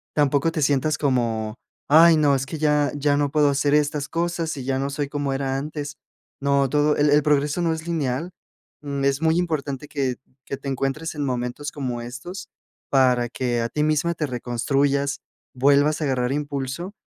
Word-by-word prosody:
tampoco 145 Hz, +2 st, +2 dB
te 155 Hz, -, -2 dB
sientas 145 Hz, +2 st, +2 dB
como: 115 Hz, -5 st, -1 dB, 0.3 s
"Ay 165 Hz, +2 st, +7 dB
no, 145 Hz, -2 st, +4 dB
es 135 Hz, 0 st, -1 dB
que 160 Hz, -, -5 dB
ya 150 Hz, -2 st, +2 dB
ya 145 Hz, 0 st, +1 dB
no 145 Hz, -1 st, 0 dB
puedo 150 Hz, -1 st, +3 dB
hacer 140 Hz, +1 st, +1 dB
estas 150 Hz, -1 st, 0 dB
cosas, 170 Hz, -1 st, -2 dB
y 135 Hz, -, -5 dB
ya 135 Hz, 0 st, 0 dB
no 135 Hz, +1 st, -1 dB
soy 145 Hz, 0 st, -3 dB
como 145 Hz, -1 st, -2 dB
era 135 Hz, 0 st, -1 dB
antes". 150 Hz, +1 st, -5 dB, 0.4 s
No, 140 Hz, -1 st, +2 dB
todo 150 Hz, +2 st, +2 dB
el 145 Hz, 0 st, +3 dB
el 150 Hz, +1 st, +5 dB
progreso 145 Hz, +2 st, +1 dB
no 165 Hz, -1 st, +1 dB
es 160 Hz, 0 st, -6 dB
lineal. 160 Hz, 0 st, -2 dB, 0.5 s
Mm, 140 Hz, -1 st, -3 dB
es 140 Hz, +1 st, +1 dB
muy 160 Hz, +1 st, +3 dB
importante 150 Hz, -5 st, -3 dB
que 135 Hz, -4 st, -1 dB, 0.3 s
que 140 Hz, -, -4 dB
te 140 Hz, -, -9 dB
encuentres 135 Hz, +5 st, -2 dB
en 145 Hz, -1 st, -2 dB
momentos 125 Hz, +3 st, -3 dB
como 125 Hz, -4 st, -4 dB
estos 130 Hz, +11 st, -8 dB, 0.4 s
para 125 Hz, -3 st, +3 dB
que 120 Hz, -1 st, -1 dB
a 115 Hz, -, -2 dB
ti 150 Hz, -, -1 dB
misma 155 Hz, +2 st, +1 dB
te 155 Hz, -, -1 dB
reconstruyas, 135 Hz, +3 st, 0 dB, 0.3 s
vuelvas 145 Hz, +4 st, +3 dB
a -, -, 0 dB
agarrar 125 Hz, -2 st, 0 dB
impulso, 145 Hz, +5 st, -4 dB
145 Hz, 185 wpm, -23 LUFS, 135-150 Hz, 0.5 s, Ay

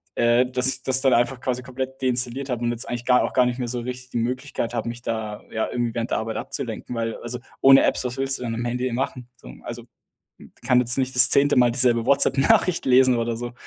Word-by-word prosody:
äh, 120 Hz, +1 st, +3 dB
dass 125 Hz, 0 st, +2 dB
ich 130 Hz, -1 st, -1 dB
das 130 Hz, 0 st, +1 dB
dann 135 Hz, -2 st, +3 dB
einfach 120 Hz, +2 st, +1 dB
quasi 125 Hz, -1 st, -3 dB
komplett 130 Hz, +1 st, -6 dB
deinstalliert 130 Hz, +1 st, -1 dB
habe 120 Hz, -1 st, -3 dB
und 120 Hz, -, 0 dB
jetzt 120 Hz, 0 st, -5 dB
eigentlich 120 Hz, 0 st, -5 dB
gar 125 Hz, -1 st, +4 dB
auch -, -, -3 dB
gar 125 Hz, -1 st, +4 dB
nicht 125 Hz, 0 st, -3 dB
mehr 125 Hz, -, -3 dB
so 120 Hz, +1 st, -3 dB
richtig 125 Hz, +1 st, -7 dB
die -, -, -3 dB
Möglichkeit 125 Hz, 0 st, -3 dB
habe, 115 Hz, 0 st, -2 dB
mich 120 Hz, +1 st, -8 dB
da 110 Hz, -2 st, -4 dB
ja 110 Hz, -, -2 dB
irgendwie 120 Hz, -2 st, -2 dB
während 115 Hz, 0 st, -3 dB
der -, -, +1 dB
Arbeit 110 Hz, 0 st, -4 dB
abzulenken, 125 Hz, -, -5 dB
weil 115 Hz, -1 st, -2 dB
äh -, -, -9 dB
also 120 Hz, +1 st, -5 dB, 0.2 s
ohne 135 Hz, 0 st, +7 dB
Apps, -, -, 0 dB
was 125 Hz, +1 st, -4 dB
willst 135 Hz, 0 st, 0 dB
du 125 Hz, -, -7 dB
dann 115 Hz, -1 st, -3 dB
am 120 Hz, -, -4 dB
Handy 125 Hz, +1 st, -2 dB
eben 120 Hz, -, -3 dB
machen, 125 Hz, -2 st, -4 dB
so. 60 Hz, -, -12 dB
Also -, -, -8 dB, 0.8 s
kann 125 Hz, -1 st, +4 dB
jetzt 125 Hz, +2 st, 0 dB
nicht 130 Hz, 0 st, -1 dB
das 125 Hz, 0 st, +6 dB
zehnte 140 Hz, +1 st, +4 dB
Mal 120 Hz, -1 st, +4 dB
dieselbe 120 Hz, -2 st, +2 dB
WhatsApp 140 Hz, -1 st, +3 dB
Nachricht 165 Hz, +5 st, +2 dB
lesen 130 Hz, -1 st, +4 dB
oder 115 Hz, 0 st, -2 dB
so. 120 Hz, 0 st, -6 dB
125 Hz, 255 wpm, -23 LUFS, 120-130 Hz, 0.8 s, ohne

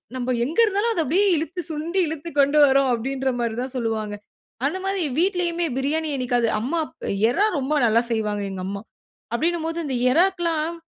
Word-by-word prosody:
நம்ம 255 Hz, 0 st, -1 dB
எங்க 315 Hz, -, -3 dB
இருந்தாலும், 415 Hz, +2 st, 0 dB
அத 340 Hz, -, 0 dB
அப்படியே 355 Hz, +10 st, +2 dB
இழுத்து 335 Hz, +3 st, -3 dB
சுண்டி 325 Hz, +5 st, -2 dB
இழுத்துக் 320 Hz, 0 st, -6 dB
கொண்டு 285 Hz, +2 st, +4 dB
வரும். 270 Hz, 0 st, +3 dB
அப்படின்ற 265 Hz, +3 st, -1 dB
மாரி 235 Hz, -2 st, -1 dB
தான் 260 Hz, -, -6 dB
சொல்வாங்க. 220 Hz, -3 st, -2 dB, 0.5 s
அந்த 305 Hz, +6 st, 0 dB
மாரி 390 Hz, 0 st, -1 dB, 0.2 s
வீட்டிலேயுமே 350 Hz, -2 st, +1 dB
பிரியாணி 305 Hz, +4 st, 0 dB
என்னிக்காவது 245 Hz, -2 st, +1 dB
அம்மா 265 Hz, +10 st, -2 dB
அப் -, -, -12 dB, 0.2 s
இறா 400 Hz, -, +2 dB
ரொம்ப 275 Hz, +2 st, -1 dB
நல்லா 230 Hz, 0 st, +4 dB
செய்வாங்க 210 Hz, -2 st, -1 dB
எங்க 190 Hz, -1 st, -5 dB
அம்மா. 200 Hz, +1 st, -4 dB, 0.5 s
அப்படினும்போது 330 Hz, +4 st, -1 dB
இந்த 270 Hz, -3 st, -2 dB, 0.2 s
இறாக்கெல்லாம் 335 Hz, -1 st, +1 dB
295 Hz, 165 wpm, -23 LUFS, 245-340 Hz, 0.5 s, கொண்டு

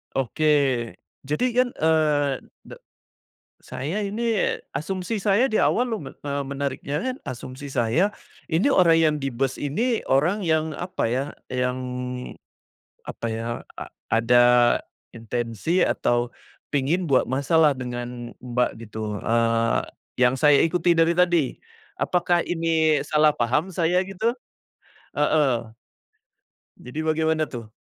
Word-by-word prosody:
Oke. 135 Hz, +3 st, -2 dB, 0.8 s
Jadi 150 Hz, -, -1 dB
kan, 250 Hz, 0 st, +3 dB
eee, 150 Hz, -4 st, +2 dB, 0.2 s
de -, -, -9 dB, 0.9 s
saya 155 Hz, +11 st, -4 dB
ini, 225 Hz, +2 st, 0 dB, 0.2 s
asumsi 185 Hz, +8 st, -3 dB
saya 210 Hz, +6 st, +3 dB
di -, -, +3 dB
awal 245 Hz, -, +3 dB
lume 190 Hz, -12 st, -5 dB
eee, 140 Hz, 0 st, -2 dB
menariknya 140 Hz, +1 st, -3 dB
kan 255 Hz, 0 st, -2 dB
asumsi 130 Hz, +3 st, -7 dB
saya, 130 Hz, -, +1 dB, 0.4 s
ini 170 Hz, -, +2 dB
orang 170 Hz, -6 st, +5 dB
yang 160 Hz, -2 st, +3 dB
di 135 Hz, -, -1 dB
bus 130 Hz, +1 st, -2 dB
ini, 225 Hz, -, 0 dB
orang 165 Hz, +10 st, +2 dB
yang 160 Hz, -1 st, +1 dB
apa 180 Hz, +1 st, -4 dB
ya, 130 Hz, +2 st, 0 dB, 0.3 s
yang 125 Hz, 0 st, -1 dB, 1.3 s
apa -, -, -7 dB
ya, 110 Hz, +1 st, -4 dB, 0.3 s
a -, -, -6 dB, 0.3 s
ada 115 Hz, +2 st, +4 dB, 0.7 s
intensi 120 Hz, -, -1 dB
atau 120 Hz, 0 st, 0 dB, 0.4 s
pingin 145 Hz, +6 st, +1 dB
buat 135 Hz, -3 st, +3 dB
masalah 145 Hz, +4 st, +3 dB
dengan, 120 Hz, -1 st, -6 dB
Mbak, 125 Hz, 0 st, 0 dB, 0.2 s
gitu, 105 Hz, -1 st, -5 dB
eee, 115 Hz, 0 st, +1 dB, 0.4 s
yang 125 Hz, 0 st, +4 dB
saya 145 Hz, -1 st, +6 dB
ikuti 175 Hz, +1 st, +2 dB
dari 165 Hz, 0 st, +4 dB
tadi. 175 Hz, -5 st, +2 dB, 0.4 s
Apakah 175 Hz, -1 st, +1 dB
ini 160 Hz, -3 st, +2 dB
salah 150 Hz, +1 st, +3 dB
paham 145 Hz, +10 st, 0 dB
saya 175 Hz, +1 st, +2 dB
gitu? 195 Hz, +4 st, 0 dB, 0.8 s
Heeh. 140 Hz, -6 st, +1 dB, 1.1 s
Jadi 125 Hz, +5 st, -7 dB
bagaimana 160 Hz, 0 st, +1 dB
tuh? 115 Hz, -3 st, -7 dB
150 Hz, 120 wpm, -24 LUFS, 125-170 Hz, 1.3 s, saya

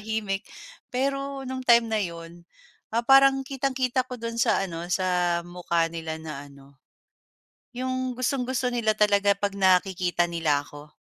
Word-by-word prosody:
nakatahimik. 210 Hz, -2 st, -3 dB, 0.4 s
Pero, 275 Hz, +1 st, -2 dB
no'ng 260 Hz, 0 st, -4 dB
time 235 Hz, -1 st, +6 dB
na 215 Hz, -, +2 dB
'yon, 170 Hz, -2 st, -7 dB, 0.5 s
ah, 230 Hz, -, +2 dB
parang 270 Hz, +2 st, +6 dB
kitang-kita 260 Hz, -1 st, -1 dB
ko 250 Hz, -2 st, -8 dB
do'n 230 Hz, 0 st, -4 dB
sa 235 Hz, -, +2 dB
ano, 165 Hz, 0 st, -6 dB
sa 180 Hz, -2 st, +1 dB
mukha 170 Hz, -1 st, -1 dB
nila 160 Hz, -1 st, -5 dB
na 150 Hz, -3 st, -7 dB
ano, 140 Hz, 0 st, -18 dB, 1.0 s
'yong 255 Hz, 0 st, -2 dB
gustong-gusto 255 Hz, 0 st, -1 dB
nila 230 Hz, -3 st, +1 dB
talaga 200 Hz, -1 st, +3 dB
'pag 200 Hz, 0 st, -3 dB
nakikita 180 Hz, -2 st, +2 dB
nila 155 Hz, -4 st, +1 dB
ako. 145 Hz, 0 st, -12 dB
205 Hz, 140 wpm, -26 LUFS, 170-255 Hz, 1.0 s, time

